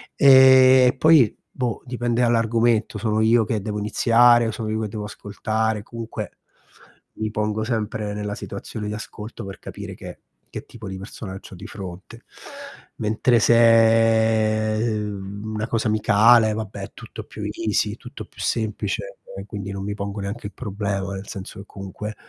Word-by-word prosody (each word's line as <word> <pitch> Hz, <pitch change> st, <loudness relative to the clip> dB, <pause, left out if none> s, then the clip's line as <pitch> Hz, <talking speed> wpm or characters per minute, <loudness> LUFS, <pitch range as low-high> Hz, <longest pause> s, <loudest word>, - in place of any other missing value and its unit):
E 130 Hz, -1 st, +7 dB
poi 150 Hz, -6 st, +5 dB, 0.2 s
boh, 125 Hz, -3 st, -2 dB
dipende 120 Hz, -1 st, -1 dB
dall'argomento, 115 Hz, -1 st, +2 dB
sono 110 Hz, -1 st, 0 dB
io 115 Hz, +1 st, +4 dB
che 110 Hz, -1 st, -2 dB
devo 105 Hz, +1 st, -4 dB
iniziare 120 Hz, +3 st, +4 dB
o 110 Hz, -, -1 dB
sono 110 Hz, 0 st, -5 dB
io 110 Hz, 0 st, -1 dB
che 110 Hz, -, -2 dB
devo 105 Hz, 0 st, -5 dB
ascoltare, 110 Hz, +1 st, -3 dB
comunque 115 Hz, +1 st, -7 dB, 0.8 s
mi 110 Hz, 0 st, -3 dB
pongo 105 Hz, 0 st, -1 dB
sempre 110 Hz, -2 st, -3 dB
nella 105 Hz, 0 st, -4 dB
situazione 105 Hz, -2 st, -7 dB
di 105 Hz, -, -3 dB
ascolto, 110 Hz, 0 st, -8 dB
per 95 Hz, -, -9 dB
capire -, -, -8 dB
che -, -, -10 dB, 0.3 s
che -, -, -6 dB
tipo 110 Hz, -3 st, -10 dB
di 95 Hz, -, -6 dB
persona 95 Hz, -1 st, -8 dB
c'ho 95 Hz, -, -13 dB
di -, -, -11 dB
fronte. 95 Hz, -2 st, -9 dB, 0.8 s
Mentre 110 Hz, +3 st, +2 dB
se, 115 Hz, -1 st, +4 dB
ehm, 105 Hz, -3 st, -3 dB
una 110 Hz, +2 st, -3 dB
cosa 115 Hz, -1 st, -1 dB
amicale, 110 Hz, +1 st, +5 dB
vabbè 110 Hz, -2 st, -6 dB
è -, -, -7 dB
tutto -, -, -10 dB
più 105 Hz, -, -11 dB
easy, 105 Hz, -1 st, -1 dB
è -, -, -8 dB
tutto 125 Hz, +2 st, -10 dB
più -, -, -21 dB
semplice 115 Hz, -, -2 dB, 0.2 s
e -, -, -7 dB
quindi 100 Hz, -2 st, -6 dB
non 95 Hz, 0 st, -5 dB
mi 100 Hz, +1 st, -3 dB
pongo 100 Hz, 0 st, -5 dB
neanche 100 Hz, +3 st, -6 dB
il 100 Hz, -, -12 dB
problema, 100 Hz, -3 st, -3 dB
nel 95 Hz, +1 st, -8 dB
senso 95 Hz, -1 st, -8 dB
che 100 Hz, -, -10 dB
comunque 100 Hz, +2 st, -7 dB
110 Hz, 165 wpm, -22 LUFS, 105-115 Hz, 0.8 s, E